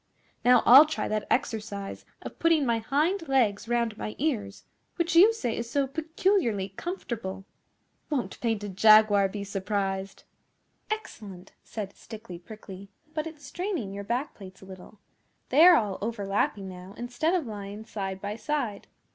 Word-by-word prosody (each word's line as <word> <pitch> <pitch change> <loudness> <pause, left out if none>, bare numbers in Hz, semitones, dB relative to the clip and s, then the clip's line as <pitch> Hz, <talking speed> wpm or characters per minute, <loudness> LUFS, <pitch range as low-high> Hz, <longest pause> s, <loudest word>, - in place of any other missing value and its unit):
Now 250 -1 +6
I'll 275 +5 +9
try 315 - -2
that 215 -1 -2
exercise 215 -6 -2 0.2
of - - -9
putting 330 -3 +3
my 235 -2 +1
hind 310 - 0
legs 235 -6 +1
round 235 -2 0
my 215 - -5
ears 220 -9 -2 0.3
which 340 0 -1
you 390 +7 +8
say 245 - -3
is 235 0 -4
so 280 +2 +1
peculiarly 310 - 0
comfortable. 195 - -5 0.6
Won't 285 -5 -3
Painted 210 -5 -2
Jaguar 215 -1 +6
be 200 +1 -5
surprised!' 195 -1 -3 0.7
'Excellent!' 205 - -6
said 205 -3 -6
Stickly 215 -6 -10
Prickly. 195 0 -11 0.2
'But 310 0 -2
it's 305 -3 -11
straining 350 - -4
your 200 0 -5
back 245 +7 -2
plates 190 -2 -13
a - - -11
little. 190 +2 -12 0.5
They 290 +5 +6
are 360 - +9
all 210 - 0
overlapping 200 -2 -1
now, 185 +1 -10
instead 245 +9 -1
of 340 -6 0
lying 205 -1 -7
side 195 -3 -5
by 205 +2 -5
side. 265 -8 -3
220 Hz, 150 wpm, -27 LUFS, 200-285 Hz, 0.7 s, I'll